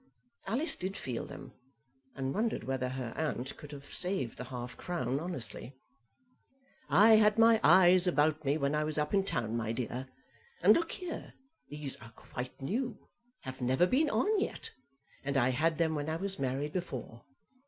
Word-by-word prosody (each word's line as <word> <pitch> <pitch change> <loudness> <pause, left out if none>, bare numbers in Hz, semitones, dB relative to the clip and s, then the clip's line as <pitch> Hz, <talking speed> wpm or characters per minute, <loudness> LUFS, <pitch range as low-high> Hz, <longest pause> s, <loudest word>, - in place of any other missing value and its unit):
Alice 275 - +1
did 190 +2 -4
feel 125 -3 -4
them, 135 -2 -10 0.6
and 135 0 -2
wondered 220 - -1
whether 130 +1 -2
her 130 -3 -5
aunt 140 -5 -3
could 150 - -11
have 140 -1 -10
saved 180 - -2
the 125 - -5
half 125 0 -6
crown 135 -7 -2
honestly. 135 - -2 1.1
"I 220 +2 +7
had 210 0 +4
my 225 0 +6
eyes 185 0 +7
about 155 -2 +2
me 145 +1 +1
when 140 -1 0
I 150 0 +1
was 155 0 0
up 150 +3 -1
in 195 -1 +4
town, 115 - -2
my 115 -1 -1
dear. 125 +2 -4 0.6
And - - +8
look 335 0 0
here, 360 -3 -6 0.3
these 150 -2 -3
are 115 -1 -14
quite 125 +3 -8
new, 220 - -3 0.3
have 130 0 -8
never 130 +7 +3
been 285 - +2
on 395 - +2
yet, - - -3 0.5
and 140 0 -1
I 125 0 +3
had 155 +5 +1
them 160 -1 +1
when 150 0 -2
I 160 - -1
was 195 +3 -3
married 135 +3 -2
before. 130 -10 -5
150 Hz, 175 wpm, -32 LUFS, 130-190 Hz, 1.1 s, And